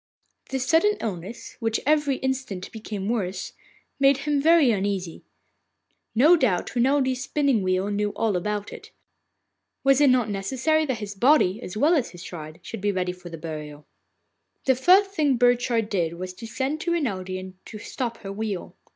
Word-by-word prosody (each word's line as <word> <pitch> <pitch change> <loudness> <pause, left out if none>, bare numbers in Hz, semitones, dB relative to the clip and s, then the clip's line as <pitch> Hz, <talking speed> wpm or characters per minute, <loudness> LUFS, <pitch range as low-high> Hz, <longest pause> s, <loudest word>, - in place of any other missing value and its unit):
This 265 -1 -2
sudden 415 +9 +3
illness, 195 +1 -6
which 225 -1 0
every 295 -2 +2
instant 260 -9 -3
became 210 -3 -5
worse, 200 -5 -2 0.5
made 275 0 +5
him 295 -2 +1
very 320 -4 +5
uneasy. 195 -4 -2 0.9
No 300 +10 +7
doubt 245 - 0
Renelde's 260 +1 +2
spinning 275 -4 +1
wheel 185 +2 0
knew 205 0 0
all 220 -4 0
about 205 +3 -3
it. - - -11 0.9
Was 275 +1 +4
it 285 - +6
not 250 -3 +3
necessary 265 +11 0
that 260 -3 -1
his 210 -2 -6
body, 230 -2 +3
as 195 -3 -7
well 300 +9 +4
as 285 -8 +1
his 175 -1 -11
shroud, 155 -3 -8
should 225 - -7
be 205 0 +1
ready 180 -2 -1
for 180 -1 -11
the 165 - -7
burial? 150 -2 -7 0.8
The 265 - +5
first 370 +10 +4
thing 295 -9 +1
Burchard 245 -2 +2
did 175 -6 -1
was 185 +2 -6
to 205 +5 -9
send 265 +7 -2
to 340 - 0
Renelde 190 - -2
and 185 0 -11
to 215 - -8
stop 235 +2 -4
her 195 0 -5
wheel. 205 -3 -4
225 Hz, 170 wpm, -25 LUFS, 190-270 Hz, 0.9 s, No